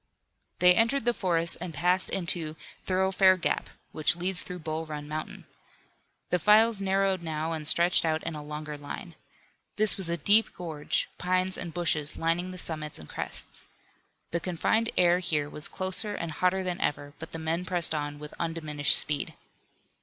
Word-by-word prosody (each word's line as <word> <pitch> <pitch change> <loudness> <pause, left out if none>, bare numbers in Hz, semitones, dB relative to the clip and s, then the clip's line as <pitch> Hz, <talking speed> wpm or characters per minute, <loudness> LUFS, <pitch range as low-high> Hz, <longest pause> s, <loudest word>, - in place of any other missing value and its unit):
They 180 0 +6
entered 230 +6 +1
the 240 - +3
forest 170 -6 +2
and 175 -3 -6
passed 180 +5 +1
into 170 -4 -3 0.3
Thoroughfare 190 0 +3
Gap, 170 - -2 0.2
which 155 +1 +2
leads 180 +1 0
through 180 - -7
Bull 160 -1 -5
Run 150 -1 -6
Mountain. 155 +1 -6 0.9
The 180 - +2
files 215 +2 +4
narrowed 195 -1 +1
now 160 0 -3
and 155 -2 0
stretched 170 +3 +5
out 160 -1 -1
in - - -4
a 150 - -6
longer 150 0 -7
line. 165 +5 -8 0.6
This 215 0 +5
was 190 -4 0
a 170 - -1
deep 205 +8 +5
gorge, 160 -4 -3
pines 185 +1 +1
and 175 - -2
bushes 155 -4 0
lining 165 +2 -1
the 185 - -8
summits 155 -3 -3
and 75 - -11
crests. - - -7 0.6
The 170 - 0
confined 190 +6 0
air 175 0 +4
here 155 -5 -1
was 150 +1 -2
closer 190 +3 -2
and 170 -1 -4
hotter 185 +4 0
than 180 0 -3
ever, 145 -1 -2
but - - -8
the - - -5
men 165 +2 -2
pressed 175 -3 0
on 145 -1 -3
with 150 0 -9
undiminished 155 -3 +2
speed. 145 -2 0
170 Hz, 170 wpm, -28 LUFS, 155-185 Hz, 0.9 s, They